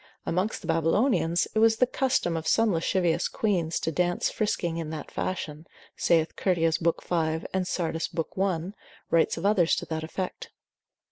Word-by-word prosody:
Amongst 185 +6 -1
the 165 - -9
Babylonians, 165 - +2
it 220 - +1
was 225 0 +5
the 250 - +4
custom 250 -9 0
of 160 0 -3
some 225 -3 +3
lascivious 170 0 +1
queans 175 -7 0
to 160 - -1
dance 175 +1 0
frisking 175 -6 -1
in 165 -2 -4
that 155 -2 -6
fashion, 160 -4 -4 0.3
saith 165 -1 +2
Curtius 165 -4 +1
lib. 170 0 +1
5. 160 -2 -1
and 185 -1 0
Sardus 165 -3 -1
de - - -17
mor. 165 - +2
gent. - - -31
lib. 190 - +1 0.3
1. - - -27 0.4
writes 165 0 +3
of 165 - -4
others 195 -5 +4
to - - -4
that 160 -1 -4
effect. 180 +3 -5
170 Hz, 185 wpm, -27 LUFS, 165-190 Hz, 0.4 s, was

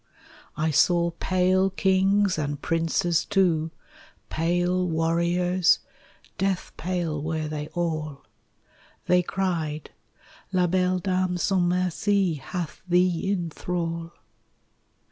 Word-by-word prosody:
I 155 +1 +1
saw 170 +3 +3
pale 185 +2 +2
kings 195 0 +2
and 145 -1 -2
princes 165 +1 +1
too, 175 -5 +1 0.6
Pale 175 +2 +1
warriors, 170 +2 +2 0.6
death 195 -1 -1
pale 170 -4 -2
were 155 0 -2
they 150 -1 -4
all: 155 -5 -3 0.8
They 180 0 +4
cried 165 -5 -2 0.6
"La 180 -2 +2
belle 185 +1 +1
dame 185 -1 0
sans 190 +1 +1
merci 185 +1 +1
Hath 155 +3 -6
thee 180 +1 +2
in 175 -4 -2
thrall!" 170 -1 -4
175 Hz, 100 wpm, -25 LUFS, 165-185 Hz, 0.8 s, They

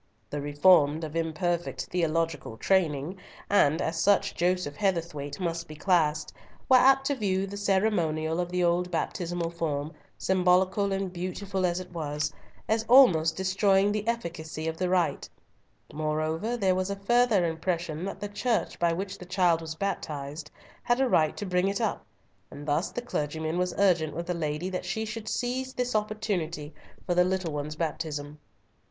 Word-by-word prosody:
The 145 - -3
Reformed 145 +1 +4
of 155 0 -6
imperfect 165 +1 -1
theological 165 -7 -1
training, 165 - +1 0.3
and 160 -5 +4
as 165 0 -2
such 200 +4 +3
Joseph 180 -4 0
Heatherthwayte 165 -5 -2
must 170 -2 -2
be 155 - -9
classed, 155 -3 +1 0.3
were 260 - +7
apt 270 +1 +5
to 285 - +1
view 195 -5 0
the 200 +1 -7
ceremonial 180 -6 +1
of 175 -1 -1
the 180 0 +1
old 175 +1 +2
baptismal 170 0 -2
form, 155 -2 -3 0.2
symbolical 185 +2 +2
and 195 -1 -2
beautiful 185 +1 -2
as 175 +1 -1
it 185 -1 -9
was, 150 -3 -2 0.3
as 220 0 +1
almost 170 -12 +6
destroying 195 +1 +3
the 210 +1 -2
efficacy 165 -8 -3
of 160 - -2
the 185 0 -1
rite. 180 -2 0 0.6
Moreover, 155 +8 -1
there 190 -4 +2
was 185 +1 -1
a 200 - -2
further 215 -1 +3
impression 165 -1 -2
that 195 - -5
the 205 - -4
Church 225 +3 -1
by 170 -1 +3
which 195 +3 -4
the 180 - -9
child 180 -3 +2
was 160 -1 -6
baptized, 150 -5 -4 0.3
had 240 +1 +1
a 270 - +3
right 155 -10 +2
to 205 - -4
bring 180 0 +1
it 200 0 -1
up, 220 -3 -1 0.5
and 145 +1 -10
thus 150 +5 +1
the 245 - -5
clergyman 160 -5 -2
was 180 0 -1
urgent 175 -6 +2
with 170 +1 -3
the 180 - -1
lady 155 +1 -2
that 185 -1 -3
she 220 +5 -2
should 215 0 -5
seize 260 +1 -2
this 250 0 -1
opportunity 200 -8 -2 0.3
for 175 - 0
the 180 0 +5
little 185 -3 -1
one's 150 +1 -4
baptism. 150 -2 -4
180 Hz, 170 wpm, -28 LUFS, 160-195 Hz, 0.6 s, were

